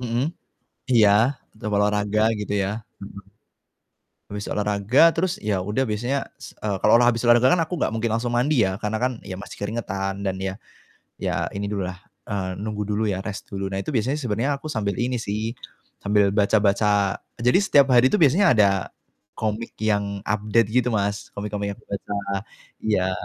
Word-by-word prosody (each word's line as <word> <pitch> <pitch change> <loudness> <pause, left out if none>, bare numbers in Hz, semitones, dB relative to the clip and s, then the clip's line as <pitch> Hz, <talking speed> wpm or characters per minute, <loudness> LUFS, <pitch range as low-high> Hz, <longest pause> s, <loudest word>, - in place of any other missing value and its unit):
Mhm, 120 +3 -1 0.7
iya. 110 -4 +6 0.4
Tetap 110 0 -6
olahraga, 105 +1 +1 0.2
gitu 105 0 -3
ya? 100 +2 -1 0.2
Mhm. 100 0 -9 1.1
Habis 105 0 -5
olahraga, 105 +4 +1
terus, 180 +1 0
ya 105 -3 0
udah 105 +7 -1
biasanya, 120 +6 -1 0.2
s - - -11
eee, 100 -2 -2
kalau 105 - +4
olah 120 - +4
habis 115 0 -3
olahraga 120 +2 +6
kan 180 - +1
aku 160 +3 -4
nggak - - +1
mungkin 115 +1 -1
langsung 120 +2 -1
mandi 125 +1 +3
ya, 95 +1 -3
karena 110 0 -1
kan, 130 +1 +2
ya 95 - -5
masih 105 - -10
keringetan 100 -2 -3
dan 95 - -1
ya 95 0 -3 0.7
ya 90 -2 -1
ini 100 +1 -3
dulu 100 -2 -2
lah, 90 0 -7 0.3
eee, 95 -2 -3
nunggu 105 -1 -3
dulu 105 +1 0
ya 95 - -2
rest 100 +1 -6
dulu. 95 0 -3
Nah, 95 - -2
itu - - -4
biasanya 125 +5 +1
sebenarnya 120 +2 -1
aku 155 - -7
sambil 100 -5 -1
ini 125 +2 -1
sih, 110 +2 -3 0.5
sambil 100 -1 +3
baca-baca 100 -1 +2 0.2
jadi 125 +9 +4
setiap 145 -9 +4
hari 125 0 +6
itu - - +3
biasanya 170 +6 +5
ada 105 -2 +6 0.7
komik 110 +1 -2
yang 100 -2 0
update 105 +1 +2
gitu, 125 +1 +2
Mas, 100 -1 -2
komik-komik 100 0 -3
yang - - -9
aku - - -25
baca, 100 - -5 0.7
iya, 95 -4 +1
105 Hz, 180 wpm, -23 LUFS, 100-120 Hz, 1.1 s, iya